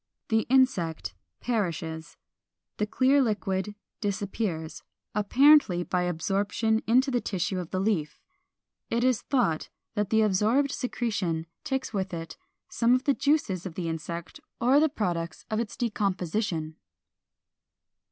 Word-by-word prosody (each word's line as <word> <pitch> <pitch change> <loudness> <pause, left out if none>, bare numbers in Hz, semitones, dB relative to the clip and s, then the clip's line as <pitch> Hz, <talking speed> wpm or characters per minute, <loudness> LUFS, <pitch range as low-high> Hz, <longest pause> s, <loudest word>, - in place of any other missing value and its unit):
The 220 -1 +2
insect 220 -12 +2 0.3
perishes; 165 -8 -3 0.6
the 210 - 0
clear 270 +5 +3
liquid 205 -3 -1 0.2
disappears, 200 -5 -3 0.3
apparently 220 -3 +5
by 180 0 0
absorption 200 +6 0
into 255 +4 +4
the 245 -2 +1
tissue 190 -2 -2
of 175 -2 -5
the 185 - -2
leaf. 190 -7 -1 0.7
It 235 +1 0
is 255 -3 +2
thought 235 - 0 0.2
that 205 -2 -1
the 220 0 +4
absorbed 215 +8 +2
secretion 205 - -2 0.2
takes 265 -3 -2
with 190 -3 -2
it 165 -1 -7 0.3
some 235 +1 +3
of 255 - -1
the 280 - +3
juices 270 - 0
of 165 - -9
the 175 -2 -3
insect 165 +1 -5 0.2
or 260 +4 +5
the 315 +1 +4
products 175 - -3
of 215 - +1
its 230 -3 -4
decomposition. 185 -7 -1
205 Hz, 130 wpm, -27 LUFS, 175-240 Hz, 0.7 s, apparently